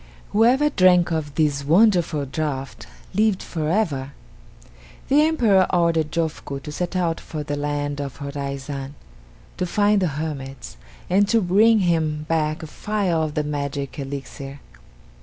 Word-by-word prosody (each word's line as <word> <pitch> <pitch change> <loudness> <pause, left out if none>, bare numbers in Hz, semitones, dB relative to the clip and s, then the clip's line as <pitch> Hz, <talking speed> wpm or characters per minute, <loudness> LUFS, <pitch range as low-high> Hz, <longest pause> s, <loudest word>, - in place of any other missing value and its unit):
Whoever 250 +8 +4
drank 180 - +4
of 150 -3 -2
this 145 -3 +1
wonderful 170 -3 +3
draught 135 -4 -4 0.3
lived 210 -1 +2
forever. 155 -5 -1 1.0
The 285 +2 +5
Emperor 230 - +3
ordered 165 -3 +2
Jofuku 160 -4 -3
to 150 - -6
set 180 +4 -3
out 170 -3 0
for 155 -2 -6
the 145 0 -3
land 145 0 -2
of 140 -2 -6
Horaizan, 140 -1 -5 0.6
to 180 - -1
find 205 +2 +2
the 185 - +2
hermits, 135 - -6 0.3
and 200 +2 +3
to 230 - +4
bring 210 +3 +4
him 160 -4 0
back 155 -1 0
a - - -6
phial 190 -1 -1
of 155 -1 -2
the 150 - +1
magic 140 -1 -4
elixir. 140 0 -7
155 Hz, 140 wpm, -22 LUFS, 140-185 Hz, 1.0 s, The